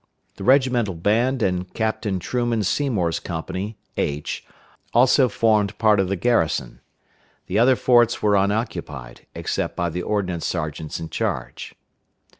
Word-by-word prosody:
The - - -7
regimental 125 -5 +3
band 115 +8 +1
and 90 -1 -1
Captain 110 -3 -1
Truman 120 +3 -1
Seymour's 100 - 0
company 95 +5 -5 0.2
(H) 75 +1 -2 0.5
also 125 +1 +5
formed 105 -3 +1
part 105 -2 +4
of 95 -2 +1
the 100 - 0
garrison. 85 - 0 0.6
The 100 +4 0
other 130 +3 +5
forts 120 -2 +3
were 105 -1 +2
unoccupied, 95 - -2
except - - -2
by 85 -1 -1
the 90 - -3
ordnance 90 -4 -2
sergeants 80 -2 -4
in 80 - -6
charge. - - -4
100 Hz, 130 wpm, -22 LUFS, 90-120 Hz, 0.6 s, also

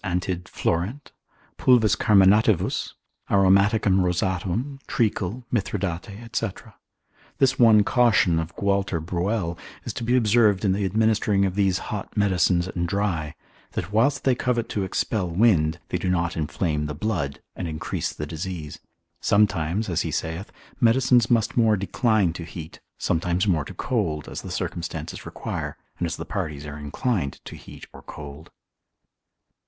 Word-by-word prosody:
antid. 90 -1 -2
florent. 100 - -2 0.5
pulvis 120 -4 +4
carminativus, 105 -1 +3 0.4
aromaticum 100 0 +4
rosatum, 95 +9 -1
treacle, 110 0 -1
mithridate 100 +1 -3
&c. 115 - +1 0.9
This 135 0 +2
one 110 -3 +7
caution 100 -9 +3
of 80 +2 -5
Gualter 100 -3 0
Bruell 85 +1 -2 0.3
is - - -4
to 120 - -5
be 120 +2 +2
observed 110 -4 +3
in 95 - +3
the 100 +1 -1
administering 105 0 +2
of 95 - -1
these 95 -2 +2 0.2
hot 105 +1 -6
medicines 90 -3 +2
and 85 -2 -2
dry, 85 -6 -1 0.4
that 95 - -4
whilst 130 +6 +2
they 130 - +4
covet 120 -2 -1
to 100 - -1
expel 95 0 -1
wind, 85 -4 +3
they - - -1
do 95 - -1
not 85 -1 0
inflame 75 -1 -1
the 75 - -5
blood, 80 -6 -2 0.2
and 90 - -4
increase 80 -1 -3
the 75 - -5
disease; 80 -1 -6 0.4
sometimes 100 -1 +2
(as 85 -4 0
he - - -2
saith) 80 +5 -4 0.3
medicines 120 0 +4
must 115 -2 +2
more 110 -3 +4
decline 100 -2 +1
to 85 - -6
heat, 80 -1 -9 0.2
sometimes 85 +2 0
more 85 -8 +1
to - - -9
cold, 75 -2 -1
as - - -6
the - - -8
circumstances 85 -1 -5
require, - - -5 0.2
and 85 - 0
as 85 - -3
the - - -6
parties 80 -7 -4
are 75 0 -7
inclined 75 - -2
to - - -8
heat - - -12
or - - -11
cold. 75 +1 -10
95 Hz, 150 wpm, -24 LUFS, 85-110 Hz, 0.9 s, one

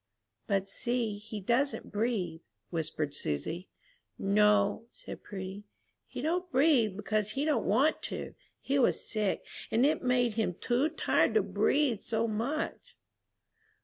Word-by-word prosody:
"But 195 -1 +1
see, 230 0 -2
he 215 0 -7
doesn't 240 +8 0
breathe," 205 -7 -1 0.3
whispered 155 -3 -2
Susy. 145 - -3 0.5
"No," 210 +2 +3
said - - -9
Prudy, 195 0 -7 0.4
"he - - -6
don't 355 +3 -1
breathe 255 - +4
because 215 0 -1
he 280 +2 -1
don't 305 -2 +1
want 265 +11 +3
to. - - -5 0.3
He 275 +1 0
was 250 - +2
sick, 210 -3 -1 0.2
and 235 +4 +3
it 300 - +2
made 250 -2 +2
him 210 -5 0
too 250 - +1
tired 320 - +2
to - - +5
breathe 275 -7 +2
so 230 0 0
much." 235 +9 -3
220 Hz, 135 wpm, -31 LUFS, 200-255 Hz, 0.5 s, to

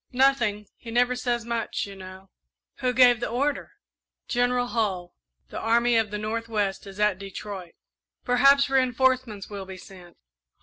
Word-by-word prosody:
"Nothing 245 -6 +2
he 235 - -11
never 245 +2 +2
says 240 -2 -2
much, 235 -1 -2
you 200 -1 -10
know." 190 0 -12 0.5
"Who 255 - 0
gave 245 -1 +5
the 240 - -3
order?" 280 +4 -2 0.5
"General 245 0 +1
Hull 190 -7 -2 0.4
the - - -6
Army 235 +1 +2
of 225 -2 +2
the 210 - -4
North 225 +2 -4
west 205 -3 -2
is 195 +1 -11
at 210 -3 +2
Detroit." 195 -2 -8 0.5
"Perhaps 275 +3 +5
reinforcements 255 -5 +1
will 200 -2 -7
be 190 -1 -8
sent." 180 -2 -14
230 Hz, 155 wpm, -25 LUFS, 200-245 Hz, 0.5 s, gave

